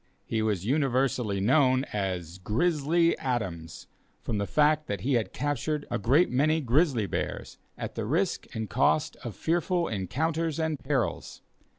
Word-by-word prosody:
He 110 Hz, -, -1 dB
was 105 Hz, -4 st, -1 dB
universally 130 Hz, -5 st, +1 dB
known 130 Hz, +4 st, +3 dB
as 90 Hz, -4 st, -3 dB
"Grizzly 160 Hz, -, +2 dB
Adams," 95 Hz, -11 st, -3 dB, 0.4 s
from 105 Hz, -, -2 dB
the 100 Hz, -, -1 dB
fact 155 Hz, 0 st, +2 dB
that 100 Hz, -3 st, -3 dB
he 135 Hz, +7 st, 0 dB
had 115 Hz, -3 st, 0 dB
captured 145 Hz, +2 st, -2 dB
a 120 Hz, -, 0 dB
great 135 Hz, -, +3 dB
many 155 Hz, +5 st, +2 dB
grizzly 135 Hz, -, +2 dB
bears, -, -, -4 dB, 0.2 s
at -, -, -5 dB
the -, -, -4 dB
risk -, -, 0 dB
and 110 Hz, -1 st, -3 dB
cost 150 Hz, +6 st, +1 dB
of 115 Hz, -5 st, -7 dB
fearful 175 Hz, -, 0 dB
encounters 155 Hz, -, -1 dB
and 160 Hz, -3 st, -1 dB
perils. 135 Hz, -3 st, -2 dB
130 Hz, 150 wpm, -28 LUFS, 105-155 Hz, 0.4 s, known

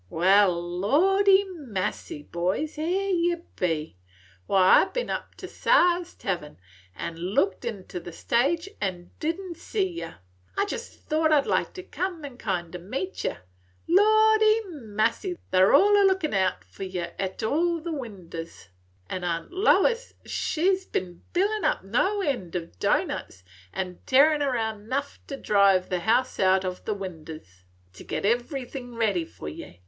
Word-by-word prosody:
"Wal, 185 Hz, +1 st, +4 dB, 0.2 s
lordy 385 Hz, -, +4 dB
massy, 190 Hz, -, -5 dB
boys! 185 Hz, -, -2 dB
Here 365 Hz, +6 st, -1 dB
ye 345 Hz, -1 st, +2 dB, 0.2 s
be! 160 Hz, -, -2 dB, 0.5 s
Why, 190 Hz, -1 st, +6 dB
I -, -, +2 dB
ben -, -, -3 dB
up -, -, -5 dB
to -, -, -8 dB
Siah's 355 Hz, -7 st, +2 dB
tahvern, 175 Hz, -6 st, -4 dB, 0.4 s
an' 165 Hz, -, -5 dB
looked 185 Hz, +2 st, 0 dB
inter 195 Hz, -6 st, -5 dB
the 175 Hz, 0 st, -9 dB
stage, 280 Hz, -, 0 dB
an' 180 Hz, -3 st, -3 dB
did 325 Hz, +3 st, -1 dB
n't 365 Hz, -4 st, -7 dB
see 395 Hz, 0 st, -1 dB
yer. 345 Hz, -2 st, -7 dB, 0.4 s
I 400 Hz, -, +2 dB
jest 465 Hz, +3 st, -7 dB
thought 315 Hz, +1 st, +1 dB
I 300 Hz, -, +6 dB
'd -, -, -13 dB
like -, -, 0 dB
to 370 Hz, -, -8 dB
come 360 Hz, -4 st, -4 dB
an' 260 Hz, -3 st, -10 dB
kind 180 Hz, -5 st, -3 dB
o' -, -, -5 dB
meet 265 Hz, -, -4 dB
yer. -, -, -3 dB, 0.5 s
Lordy 435 Hz, +3 st, +5 dB
massy, 230 Hz, -, -1 dB
they 185 Hz, -, +3 dB
's 190 Hz, -, +6 dB
all 410 Hz, +8 st, +6 dB
a 410 Hz, -, +5 dB
lookin' 380 Hz, -, +2 dB
out 185 Hz, -, +1 dB
for 90 Hz, -, -16 dB
yer 180 Hz, -3 st, -4 dB
't 190 Hz, +1 st, -3 dB
all 335 Hz, +7 st, +1 dB
the 330 Hz, +1 st, -4 dB
winders; 175 Hz, -, -8 dB, 0.4 s
'n' 185 Hz, -, -4 dB
Aunt 170 Hz, -1 st, -2 dB
Lois, 465 Hz, +5 st, +2 dB
she 360 Hz, +4 st, +1 dB
's 380 Hz, -, -10 dB
ben 180 Hz, -, -4 dB
bilin' 410 Hz, +4 st, +1 dB
up -, -, +1 dB
no 375 Hz, -, +1 dB
end 245 Hz, -, -2 dB
o' 170 Hz, -2 st, -2 dB
doughnuts, 95 Hz, -, -1 dB, 0.3 s
an' 185 Hz, -2 st, -4 dB
tearin' 295 Hz, +3 st, +5 dB
round 220 Hz, -6 st, -2 dB
'nough 280 Hz, +2 st, -2 dB
to 275 Hz, -, -5 dB
drive 200 Hz, -5 st, +3 dB
the 180 Hz, -, 0 dB
house 235 Hz, +7 st, +1 dB
out 190 Hz, 0 st, +3 dB
o' 185 Hz, -, 0 dB
the 210 Hz, +3 st, -4 dB
winders, 160 Hz, -, -9 dB, 0.3 s
to 95 Hz, -, -12 dB
git -, -, -3 dB
everything 245 Hz, +1 st, -2 dB
ready 205 Hz, -7 st, +1 dB
for 120 Hz, -, -10 dB
ye. 80 Hz, +3 st, -9 dB
235 Hz, 165 wpm, -26 LUFS, -, 0.5 s, Why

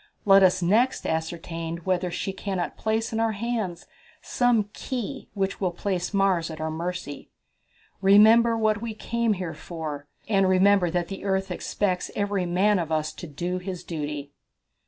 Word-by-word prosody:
Let 195 Hz, -1 st, +7 dB
us 185 Hz, -1 st, +4 dB
next 230 Hz, +9 st, +2 dB
ascertain 165 Hz, +1 st, -3 dB
whether 185 Hz, 0 st, 0 dB
she 195 Hz, +2 st, -3 dB
cannot 190 Hz, -2 st, -3 dB
place 220 Hz, +1 st, -1 dB
in 225 Hz, -, 0 dB
our 225 Hz, -1 st, +1 dB
hands 215 Hz, -5 st, -3 dB, 0.3 s
some 230 Hz, -4 st, +1 dB
key 260 Hz, +1 st, -5 dB
which 195 Hz, 0 st, -2 dB
will 185 Hz, -, +2 dB
place 180 Hz, 0 st, -2 dB
Mars 195 Hz, -5 st, +2 dB
at 160 Hz, -1 st, -7 dB
our 160 Hz, 0 st, -2 dB
mercy. 165 Hz, -2 st, -5 dB, 0.7 s
Remember 220 Hz, +4 st, +6 dB
what 215 Hz, -1 st, +1 dB
we 230 Hz, -2 st, -4 dB
came 235 Hz, 0 st, 0 dB
here 180 Hz, -4 st, -4 dB
for, 155 Hz, -4 st, -6 dB, 0.2 s
and 195 Hz, -3 st, +3 dB
remember 185 Hz, -1 st, +4 dB
that 175 Hz, 0 st, -1 dB
the 195 Hz, -, -6 dB
earth 190 Hz, -1 st, -1 dB
expects 185 Hz, -3 st, -1 dB
every 200 Hz, -3 st, 0 dB
man 190 Hz, +3 st, +3 dB
of 165 Hz, -2 st, -3 dB
us 155 Hz, -1 st, 0 dB
to 175 Hz, -, -8 dB
do 175 Hz, +5 st, -3 dB
his 180 Hz, -1 st, -6 dB
duty." 150 Hz, -3 st, -5 dB
190 Hz, 160 wpm, -25 LUFS, 170-210 Hz, 0.7 s, Let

